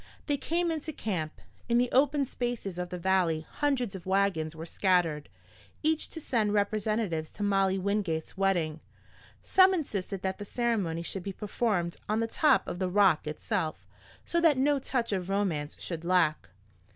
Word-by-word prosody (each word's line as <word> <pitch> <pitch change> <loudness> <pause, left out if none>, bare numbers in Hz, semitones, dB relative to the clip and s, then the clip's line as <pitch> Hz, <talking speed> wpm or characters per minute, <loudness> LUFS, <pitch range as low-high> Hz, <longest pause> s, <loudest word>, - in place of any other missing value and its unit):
They 290 - +1
came 335 +4 0
into 315 0 -3
camp. 175 - -3 0.3
In 235 - +4
the 245 0 +2
open 280 +1 +3
spaces 240 -8 -4
of 180 0 -3
the 180 - -4
valley 175 -3 +1
hundreds 270 -7 -1
of 190 -1 -8
wagons 190 -5 +1
were 160 +1 -7
scattered, 170 -5 +1 0.5
each 315 0 +1
to 325 - -7
send 220 -8 0
representatives 205 -5 0
to 205 - -5
Molly 195 -1 +2
Wingate's 190 -5 -1
wedding. 175 -5 +1 0.6
Some 375 0 +5
insisted 200 - -3
that 190 +1 -2
the - - -4
ceremony 200 -8 -1
should 190 +2 -5
be 195 +2 -5
performed 200 -4 -1
on 215 +1 +1
the 230 - +1
top 300 +7 +3
of 175 - -4
the 185 -1 0
Rock 190 -5 +4
itself, 155 +1 -3 0.4
so 340 - +1
that 320 -5 +5
no 280 +2 +3
touch 250 -3 -1
of 185 -1 -2
romance 180 -7 -1
should 165 -2 -5
lack. 170 - +2
195 Hz, 165 wpm, -29 LUFS, 175-240 Hz, 0.6 s, Some